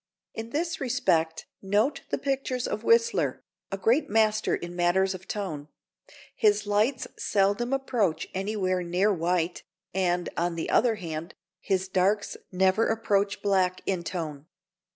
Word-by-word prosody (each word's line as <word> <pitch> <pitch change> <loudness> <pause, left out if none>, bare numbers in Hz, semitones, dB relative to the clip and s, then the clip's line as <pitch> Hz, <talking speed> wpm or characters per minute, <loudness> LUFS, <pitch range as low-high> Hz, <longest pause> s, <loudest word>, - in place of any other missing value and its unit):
In 225 +1 -6
this 325 +5 -2
respect 200 -12 +1 0.2
note 210 +9 +1
the - - 0
pictures 270 -2 -1
of - - -3
Whistler, 465 0 +2 0.3
a 195 - -2
great 235 +9 +2
master 215 0 +2
in 175 0 -7
matters 185 +2 +2
of 185 0 -10
tone; 160 -9 -4 0.7
his 210 -2 +3
lights 215 +6 +1
seldom 205 +5 +1
approach 245 -10 0
anywhere 190 -2 -1
near 180 +4 +2
white, 175 0 0 0.3
and, 180 -2 +1
on 170 0 0
the 165 - -3
other 230 -1 +4
hand, 165 -3 -6 0.2
his 190 -1 0
darks 195 +2 +1 0.2
never 190 +4 +3
approach 205 -2 0
black 190 -2 +2
in 185 -3 -1
tone. 155 -4 -5
195 Hz, 135 wpm, -27 LUFS, 180-225 Hz, 0.7 s, other